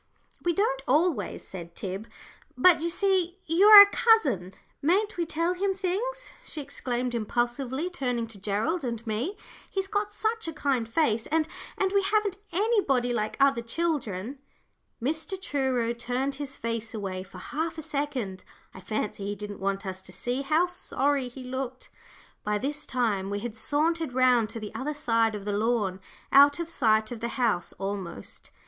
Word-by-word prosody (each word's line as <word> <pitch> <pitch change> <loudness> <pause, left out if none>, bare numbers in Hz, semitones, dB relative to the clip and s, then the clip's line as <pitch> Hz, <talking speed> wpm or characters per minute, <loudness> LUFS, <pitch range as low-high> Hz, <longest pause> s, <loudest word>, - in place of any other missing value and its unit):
"We 345 - +2
don't 325 -8 +1
always," 295 - +1
said 170 -2 -9
Tib; 195 +3 -5 0.5
"but 320 +4 +6
you 340 - 0
see 370 -1 +1
you 340 +6 +4
are 420 -1 +13
a 405 - -2
cousin; 260 - +3 0.3
mayn't 395 +8 +2
we 340 -2 -1
tell 335 +3 0
him 385 +1 0
things?" 435 +7 -3
she 315 - -7
exclaimed, 250 -3 -3
impulsively, 240 +6 -1
turning 250 -9 -2
to 210 -3 -9
Gerald 220 - -1
and 235 -2 -4
me. 235 - -2 0.3
"He's 385 -1 -2
got 410 +1 -1
such 445 -2 -2
a 325 - -3
kind 265 -6 0
face, 230 -5 +1
and 315 0 +1 0.3
and 385 -1 +1
we 400 0 +3
haven't 405 -1 +1
anybody 345 - +2
like 215 -2 -2
other 275 -3 +4
children." 255 - -2 0.6
Mr. 320 - -2
Truro 260 -8 0
turned 250 +3 -2
his 275 -1 -6
face 230 0 -3
away 190 -3 -4
for 190 +1 -12
half 320 +2 -3
a 315 - -5
second. 280 - -3 0.3
I - - -10
fancy 210 0 -3
he 205 - -2
didn't 205 0 -7
want 195 +1 -2
us 190 0 -5
to - - -10
see 250 +2 -2
how 310 +5 +3
sorry 285 -6 -1
he 255 +1 -9
looked. 260 0 -5 0.5
By 210 0 0
this 290 +6 -4
time 215 -6 0
we 205 0 -2
had 235 -1 -5
sauntered 310 +4 0
round 250 -3 +4
to 225 +1 -6
the 215 -1 -7
other 295 +3 -3
side 230 -6 +2
of 200 -1 -7
the 205 - -1
lawn, 210 -3 0 0.3
out 285 +1 +7
of 335 -1 -3
sight 220 -6 +2
of 240 - -5
the 235 - -2
house 225 -9 +1
almost. 195 - -6
260 Hz, 170 wpm, -27 LUFS, 220-335 Hz, 0.6 s, are